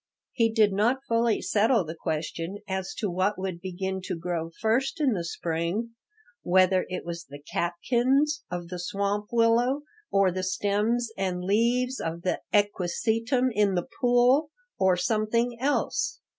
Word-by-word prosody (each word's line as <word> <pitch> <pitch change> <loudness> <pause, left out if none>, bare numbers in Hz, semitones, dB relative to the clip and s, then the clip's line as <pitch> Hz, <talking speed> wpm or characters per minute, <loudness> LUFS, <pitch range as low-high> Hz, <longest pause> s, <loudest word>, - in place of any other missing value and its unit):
He 230 -3 +2
did 215 -3 +3
not 240 +7 +1
fully 230 -1 +1
settle 210 +2 +2
the 160 - -5
question 165 +3 -4
as 190 -1 -3
to 210 - -2
what 185 +3 0
would 185 -2 -4
begin 190 +1 -3
to - - -3
grow 165 -1 -3
first 235 +7 +1
in 280 -5 +3
the 175 -4 -2
spring, 170 +7 -2 0.5
whether 185 +1 +3
it 180 0 -4
was 170 0 -5
the 140 +1 -10
catkins 245 - 0
of 175 -1 -5
the 180 0 -5
swamp 200 +3 -2
willow 240 +4 +3 0.3
or 195 -2 +4
the 185 +1 -3
stems 210 +5 0
and 180 -2 -2
leaves 240 +6 +1
of 165 +1 -4
the 185 - -1
equisetum 220 +5 +1
in 205 -3 +2
the 175 - 0 0.2
pool, 250 +4 +4 0.3
or 190 -1 +4
something 230 +4 0
else. 285 +2 0
205 Hz, 150 wpm, -27 LUFS, 180-235 Hz, 0.5 s, or